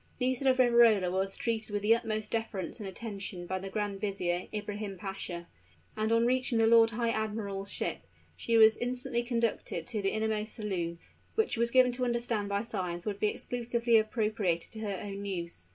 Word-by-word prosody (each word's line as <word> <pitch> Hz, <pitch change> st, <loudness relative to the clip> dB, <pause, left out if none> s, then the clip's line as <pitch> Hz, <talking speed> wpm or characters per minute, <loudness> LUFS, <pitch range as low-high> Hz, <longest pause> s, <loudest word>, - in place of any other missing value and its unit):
Nisida 260 Hz, +1 st, +2 dB
of 255 Hz, -, +3 dB
Riverola 235 Hz, -7 st, +5 dB
was 190 Hz, +1 st, -1 dB
treated 225 Hz, -2 st, -2 dB
with 205 Hz, 0 st, -2 dB
the 220 Hz, +2 st, +6 dB
utmost 215 Hz, -2 st, -2 dB
deference 225 Hz, -3 st, -3 dB
and 200 Hz, -3 st, -4 dB
attention 195 Hz, -3 st, -6 dB
by 185 Hz, +1 st, -2 dB
the 195 Hz, +1 st, -6 dB
Grand 205 Hz, -1 st, -3 dB
Vizier, 180 Hz, -3 st, -1 dB
Ibrahim 210 Hz, -1 st, -4 dB
Pasha; 190 Hz, -3 st, -5 dB, 0.5 s
and 215 Hz, +1 st, 0 dB
on 230 Hz, +1 st, +4 dB
reaching 255 Hz, 0 st, +2 dB
the 225 Hz, -, +4 dB
lord 225 Hz, 0 st, +6 dB
high 230 Hz, +1 st, 0 dB
admiral's 210 Hz, -3 st, -3 dB
ship, -, -, -1 dB, 0.4 s
she 230 Hz, -1 st, +1 dB
was 220 Hz, 0 st, +7 dB
instantly 245 Hz, -1 st, -1 dB
conducted 235 Hz, -2 st, -1 dB
to 230 Hz, -4 st, -3 dB
the 195 Hz, -, +1 dB
innermost 220 Hz, 0 st, -1 dB
saloon, 180 Hz, -6 st, -3 dB, 0.4 s
which 445 Hz, 0 st, +1 dB
she -, -, -1 dB
was 235 Hz, 0 st, +3 dB
given 255 Hz, 0 st, +5 dB
to 250 Hz, +1 st, -2 dB
understand 235 Hz, -4 st, -1 dB
by 200 Hz, +1 st, 0 dB
signs 180 Hz, -6 st, -4 dB
would 205 Hz, -2 st, -3 dB
be 210 Hz, -, +2 dB
exclusively 235 Hz, +1 st, 0 dB
appropriated 215 Hz, -6 st, 0 dB
to 220 Hz, -, -8 dB
her 205 Hz, -3 st, -3 dB
own 200 Hz, -1 st, -5 dB
use. 170 Hz, -, -4 dB
215 Hz, 185 wpm, -30 LUFS, 195-235 Hz, 0.5 s, was